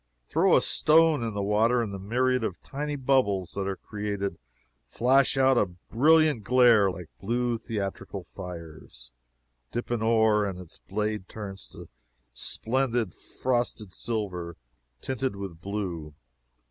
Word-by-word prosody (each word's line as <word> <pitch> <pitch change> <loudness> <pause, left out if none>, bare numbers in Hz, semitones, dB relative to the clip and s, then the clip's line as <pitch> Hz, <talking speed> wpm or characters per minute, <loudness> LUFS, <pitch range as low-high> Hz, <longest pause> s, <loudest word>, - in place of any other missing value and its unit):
Throw - - +4
a - - +2
stone 160 -2 +4
into 115 - -1
the 100 -2 -3
water, 110 +4 +3
and 110 -4 -2
the 100 - -5
myriad 125 +5 +1
of 95 -5 -3
tiny 145 +1 -4
bubbles 125 - +1
that 100 -1 -3
are 95 - -2
created 100 -4 -4 0.5
flash 130 - +3
out 130 -2 +4
a 100 - +2
brilliant 140 - +2
glare 120 -4 +5
like 90 -3 -7
blue 120 +3 -1
theatrical 100 -3 -5
fires. 85 -10 -10 0.6
Dip 120 0 -4
an 120 -2 0
oar, 110 -2 +3
and 95 -3 -3
its 90 -3 -11
blade 105 0 -3
turns 100 -3 -7
to - - -11 0.5
splendid 120 -4 0
frosted 120 -6 -2
silver, 95 -7 -3 0.4
tinted 130 -3 -2
with 95 -4 -7
blue. 90 -7 -4
105 Hz, 135 wpm, -27 LUFS, 95-125 Hz, 0.6 s, glare